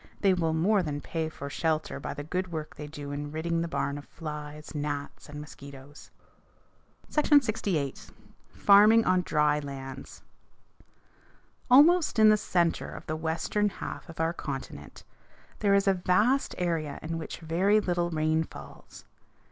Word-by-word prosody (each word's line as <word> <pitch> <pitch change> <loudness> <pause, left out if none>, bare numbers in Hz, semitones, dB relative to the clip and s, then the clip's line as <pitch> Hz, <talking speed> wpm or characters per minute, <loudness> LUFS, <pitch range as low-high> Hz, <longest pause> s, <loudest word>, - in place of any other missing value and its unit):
They 195 -2 +4
will 165 -3 0
more 195 +5 +3
than 150 -4 -3
pay 160 +1 -3
for 140 -2 -8
shelter 155 +2 -1
by - - -5
the 145 - -6
good 180 +4 -3
work 155 -2 -5
they 150 - -7
do 145 -1 -8
in 145 +1 -5
ridding 165 +2 -1
the 170 - -2
barn 140 -1 -2
of 145 - -12
flies, 150 -1 -8
gnats, 145 -1 -5
and 150 0 -7
mosquitoes. 140 -1 -12 1.0
SECTION 300 -1 +4
LXVIII. 195 - -1 0.6
FARMING 210 +3 +6
ON 185 0 +3
DRY 150 -3 +2
LANDS 135 -2 -8 1.5
Almost 310 +6 +6
in 215 -1 +7
the 215 - +6
center 175 -5 0
of - - -9
the 155 - -3
western 165 +6 -1
half 185 - -7
of 165 - -11
our 165 +1 +1
continent 135 - -7 0.6
there 200 -2 +3
is 200 +1 +2
a 195 - +5
vast 210 +9 +1
area 165 -5 -2
in 165 +1 -3
which 160 - -6
very 180 +6 +2
little 175 -3 0
rain 160 0 +1
falls. - - -13
160 Hz, 155 wpm, -28 LUFS, 150-190 Hz, 1.5 s, in